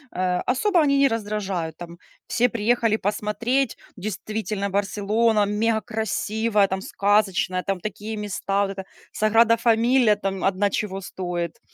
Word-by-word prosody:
э, 180 -1 0
особо 355 +9 +2
они 280 -2 +3
не 275 0 +4
раздражают. 200 -7 -3
Там 170 0 -10 0.3
все 245 - +2
приехали 230 -1 +1
посмотреть, 220 +5 -1 0.2
действительно 210 +1 -3
Барселона 210 +3 +1
мегакрасивая, 220 -1 0
там 190 - -2
сказочная, 195 -3 +1
там 195 -2 -2
такие 215 +2 -5
места. 200 -1 -2
Вот 200 -1 0
эта 190 -1 -7 0.3
Саграда-Фамилия 230 +1 +3
там 195 -2 -3
одна 195 +1 +2
чего 195 -1 -3
стоит. 175 -2 -4
210 Hz, 125 wpm, -23 LUFS, 195-225 Hz, 0.3 s, не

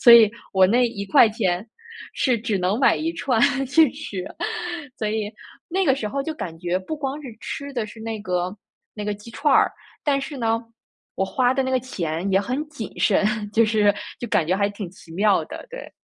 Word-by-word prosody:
所 240 -3 +9
以 225 -3 +9 0.2
我 190 -2 +5
那 240 +4 +4
¥1 200 -2 +2 0.5
是 250 -4 +2
只 215 -2 -1
能 185 +5 +1
买 - - +5
1 330 +1 -1
串 250 -5 +1 0.3
去 290 +1 +5
吃 185 -3 -5
啊。 - - -9 0.6
所 215 - -1
以 215 -1 -2 0.4
那 380 +2 +1
个 270 -6 +4
时 225 -6 -3
候 275 +5 -2
就 320 - -3
感 170 - -6
觉 175 +1 0
不 190 +12 -5
光 285 0 -3
是 265 - -7
吃 280 0 -5
的 235 - -1
是 220 +1 -12
那 220 -1 -4
个 180 0 -2 0.4
那 210 -1 -5
个 210 - 0
鸡 205 +3 -12
串 285 +5 +1
儿， - - +4 0.3
但 280 -2 +2
是 280 +1 -6
呢， 230 -2 +1 0.5
我 190 - 0
花 250 +4 +2
的 270 - +2
那 260 - -2
个 260 -1 +2
钱 180 -6 -3
也 190 - +5
很 255 +8 -2
谨 265 -8 -6
慎， 205 -1 +3 0.3
就 230 +1 +5
是 210 -2 +3 0.3
就 240 - -4
感 165 - +2
觉 180 - +2
还 200 0 +2
挺 200 -3 -7
奇 175 -2 -17
妙 200 +3 +3
的， - - -8
对。 - - -9
220 Hz, 215 characters per minute, -23 LUFS, 200-260 Hz, 0.6 s, 所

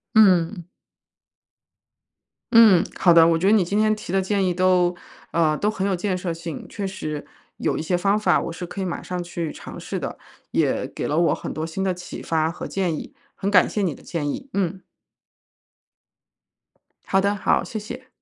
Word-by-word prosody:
嗯。 185 -4 +4 1.9
嗯， 220 -7 +7
好 175 - +5
的， 165 -1 +7
我 165 -1 +3
觉 185 +4 +1
得 210 - +5
你 210 -4 +5
今 200 +4 0
天 215 0 +3
提 190 - -7
的 195 - +3
建 195 0 0
议 180 - +1
都 180 -1 +3 0.4
呃， 155 -2 +2
都 210 +1 +1
很 195 -1 -2
有 190 - +1
建 185 +1 -1
设 180 -2 -3
性。 165 -1 -7
确 200 - -4
实， 155 -6 -5 0.3
有 - - 0
一 - - -2
些 175 +2 0
方 200 +3 +2
法 185 -4 +3
我 170 - -4
是 175 +1 -6
可 185 +3 -8
以 190 - -1
马 175 - -3
上 180 -1 -4
去 170 -2 -4
尝 - - -9
试 - - -4
的， - - -5 0.3
也 - - +1
给 - - -5
了 150 - 0
我 170 0 +3
很 - - -6
多 155 - -3
新 165 +4 -4
的 185 -1 +1
启 180 0 -8
发 160 0 0
和 - - -7
建 180 -5 -1
议。 - - -8 0.2
很 195 - -2
感 185 -3 +5
谢 210 - -2
你 170 -7 0
的 - - -17
建 150 -4 -3
议， 275 - -5
嗯。 190 -1 -1 2.2
好 195 0 +2
的， 200 +1 +1
好， 200 - +1
谢 225 - -6
谢。 255 +5 -9
185 Hz, 215 characters per minute, -23 LUFS, 170-200 Hz, 2.2 s, 嗯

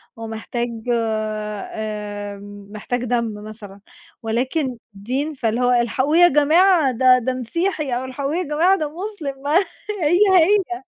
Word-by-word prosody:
ومحتاج 225 +1 -4 0.3
آمم، 210 -2 -4
محتاج 240 +3 -4
دم 235 -2 -1
مثلًا، 210 -2 -10 0.4
ولكن 255 +4 -1 0.2
دين، 260 +10 -3
فاللي 235 -2 -1
هو 250 0 +3
الحقوه 250 +6 +1
يا 350 0 +8
جماعة 315 +1 +4
ده 255 +1 +5
ده 255 +2 -2
مسيحي، 305 - -2
أو 250 - -3
الحقوه 275 +4 -3
يا 365 - 0
جماعة 335 +5 +2
ده 305 -4 -2
مسلم، 340 -9 -6
ما 290 +2 0 0.3
هي 355 -4 +1 0.2
هي. 370 0 +1
255 Hz, 130 wpm, -21 LUFS, 220-310 Hz, 0.4 s, يا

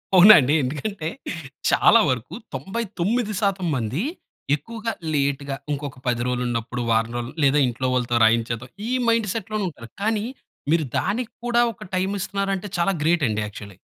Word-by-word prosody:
అవునా 195 +4 +10
అండి. 140 +1 +2
ఎందుకంటే 155 +6 -3 0.6
చాలా 230 - +6
వరకు 130 - -2 0.2
99% 195 - -1
మందీ 125 - -1 0.5
ఎక్కువగా 230 +6 -5 0.2
లేట్‌గ 140 -1 0 0.2
ఇంకొక 145 -2 -4
10 120 -1 +1
రోజులు 125 0 -1
ఉన్నప్పుడు, 120 +1 -3
వారం 115 +1 +2
రోజులు 120 0 -5
లేదా 140 +2 +4
ఇంట్లో 125 +2 -2
వాళ్ళతో 120 -1 +1
రాయించేద్దాం. 115 +2 +2 0.2
ఈ - - -2 0.2
మైండ్ 230 -1 +3
సెట్‌లోనే 215 -1 -3
ఉంటారు. 115 -7 -12
కానీ 215 0 +1 0.5
మీరు 160 -2 +3
దానికి 220 +5 -2
కూడా 240 0 +3
ఒక - - -11
టైమిస్తున్నారంటే 195 +1 -1
చాలా 185 +3 +3
గ్రేటండి 145 -10 +2
యాక్చువల్లి. 100 -2 -10
155 Hz, 140 wpm, -23 LUFS, 125-205 Hz, 0.6 s, అవునా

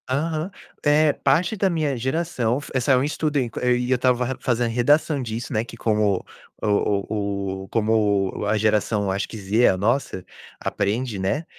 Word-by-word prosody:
Aham. 155 +6 -1 0.3
Eh, 150 0 +4
parte 175 +5 +1
da 195 -1 +1
minha 155 -5 0
geração 130 -2 -1
f 145 - -11
saiu 130 +1 +3
um - - 0
estudo 150 0 -1
en 125 -4 0
e 125 0 +1
eu 130 - +4
tava 125 0 +2
ra 130 +1 -3
fazendo 120 -1 0
redação 145 +4 +2
disso, 115 0 -5
né, 110 0 +1
que 115 0 -11
como 105 -4 +1 0.4
o - - -1 0.4
o 100 -2 -3
o - - -11
como 105 -3 +1
a 105 +1 +2
geração, 105 -1 +1
acho 95 +1 -2
que, 115 - -7
Z, 105 +4 +2
a 95 - +3
nossa, 105 -2 -1 0.3
aprende, 110 +2 -2
né. 120 - -1
120 Hz, 175 wpm, -23 LUFS, 105-140 Hz, 0.4 s, Eh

